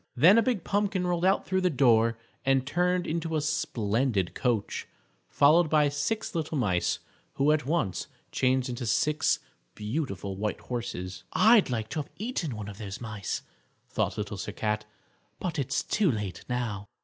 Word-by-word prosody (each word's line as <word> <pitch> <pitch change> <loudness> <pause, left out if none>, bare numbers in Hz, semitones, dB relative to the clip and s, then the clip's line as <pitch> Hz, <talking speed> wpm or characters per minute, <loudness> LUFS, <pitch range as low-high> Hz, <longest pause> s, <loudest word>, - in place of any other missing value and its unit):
Then 180 - +7
a - - +5
big 225 -6 0
pumpkin 200 -2 0
rolled 175 -1 0
out 190 +1 +3
through 190 0 0
the 185 - +3
door 115 -6 +4 0.3
and 135 -1 +2
turned 180 +4 +1
into 165 0 -2
a - - +2
splendid 115 - 0
coach, 120 -5 -1 0.4
followed 155 +3 +5
by 150 -2 +4
six 145 +11 -2
little 160 -2 -2
mice, 95 -9 +1 0.4
who 140 +2 +3
at 150 -4 +1
once 115 - 0 0.2
changed 130 0 +2
into 120 -1 -4
six 150 +6 +2 0.4
beautiful 105 - -3
white 105 +2 -2
horses. 105 -7 -5
"I'd 220 - +6
like 110 -3 -2
to - - -3
have 145 - -5
eaten 200 - -3
one 105 -1 -6
of 105 0 -9
those 100 -2 -6
mice," 110 -5 -4 0.5
thought - - -1
Little 105 -1 -4
Sir 100 +1 -5
Cat, 105 0 -1 0.5
"but 175 -5 -3
it's 135 +1 0
too 200 -7 +2
late 105 -6 -4
now." 110 -5 -2
130 Hz, 165 wpm, -28 LUFS, 105-165 Hz, 0.5 s, Then